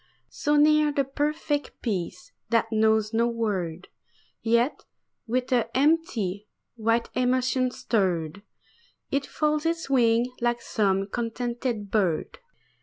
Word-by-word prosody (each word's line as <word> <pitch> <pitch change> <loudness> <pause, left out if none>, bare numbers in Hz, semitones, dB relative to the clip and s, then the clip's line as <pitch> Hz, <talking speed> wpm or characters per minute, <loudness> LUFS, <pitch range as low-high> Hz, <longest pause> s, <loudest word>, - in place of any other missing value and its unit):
So 295 0 0
near 300 0 +5
the 285 -1 +1
perfect 290 +2 -2
peace 180 -4 -3 0.2
that 230 -1 +1
knows 220 0 +2
no 230 +1 +3
word; 190 -7 -2 0.5
Yet 235 +4 +1 0.4
with 250 +3 -1
an 240 -2 +3
empty, 245 - +1 0.3
white 230 0 0
emotion 255 0 +1
stirred, 185 -7 -1 0.7
It 275 0 0
folds 305 +1 0
its 330 -4 -2
wings 235 -1 +3
like 240 0 +1
some 195 -4 0
contented 235 -1 -3
bird. 185 - 0
235 Hz, 110 wpm, -26 LUFS, 215-270 Hz, 0.7 s, near